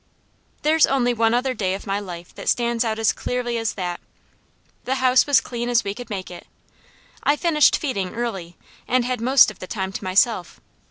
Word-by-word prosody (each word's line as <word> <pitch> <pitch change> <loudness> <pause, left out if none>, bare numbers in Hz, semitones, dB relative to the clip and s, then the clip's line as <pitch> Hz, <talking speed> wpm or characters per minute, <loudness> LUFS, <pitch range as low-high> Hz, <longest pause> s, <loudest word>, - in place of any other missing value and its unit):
There's 315 +1 +4
only 245 -3 +1
one 225 0 +2
other 255 +1 0
day 190 -5 -1
of 195 - -9
my 200 0 -1
life 175 -4 -9
that - - -4
stands 235 -1 +1
out 220 -2 -2
as 225 -1 +2
clearly 240 -1 -3
as 225 -1 -2
that. 180 -3 -4 0.9
The 265 - 0
house 255 0 +3
was 285 - +5
clean 240 0 -5
as 240 -1 +2
we 200 - -3
could 245 +4 -10
make 190 -4 -5
it. 175 - -11 0.7
I 290 - +2
finished 300 -3 +3
feeding 200 - -3
early, 195 -8 -4 0.3
and 250 -1 +2
had 250 -2 -2
most 255 -1 +5
of 205 - -17
the 185 - -8
time 190 -2 -3
to 195 - -6
myself. 185 0 +1
230 Hz, 200 wpm, -22 LUFS, 195-250 Hz, 0.9 s, was